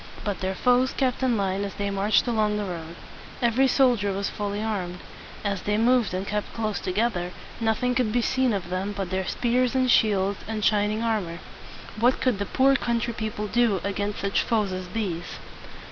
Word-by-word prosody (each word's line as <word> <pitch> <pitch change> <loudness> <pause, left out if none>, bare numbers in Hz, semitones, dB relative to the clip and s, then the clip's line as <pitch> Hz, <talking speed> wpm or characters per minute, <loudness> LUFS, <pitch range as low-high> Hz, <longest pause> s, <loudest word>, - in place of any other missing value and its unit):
But 205 -2 -2
their 190 0 -2
foes 250 +3 +3
kept 260 -2 0
in 250 -3 +2
line 195 0 0
as 200 -2 -5
they 200 0 -2
marched 200 +2 +2
along 215 -3 +1
the 210 - -2
road. 170 -2 -6 0.4
Every 240 +3 +3
soldier 245 -7 +3
was 195 +1 -2
fully 205 0 -3
armed. 195 -5 -3 0.5
As 200 -2 -1
they 210 0 0
moved 240 0 +3
and 190 +1 -2
kept 210 0 -3
close 215 -2 -1
together, 185 -2 -1 0.3
nothing 230 +2 +1
could 240 -3 +1
be 240 +1 +1
seen 260 0 +2
of 195 -4 -3
them 190 +3 -2
but 195 -2 -3
their 190 0 -1
spears 250 +1 +1
and 255 -1 +3
shields 200 -3 +3
and 215 -1 -2
shining 210 +1 +2
armor. 205 -7 -1 0.6
What 245 +3 +3
could 250 -6 +1
the 200 - -2
poor 270 +1 +4
country 235 -2 -1
people 215 -1 -4
do 220 -2 +2
against 200 +1 -2
such 200 0 +1
foes 215 -4 0
as 185 0 -4
these? 180 -4 -4
210 Hz, 190 wpm, -25 LUFS, 195-235 Hz, 0.6 s, poor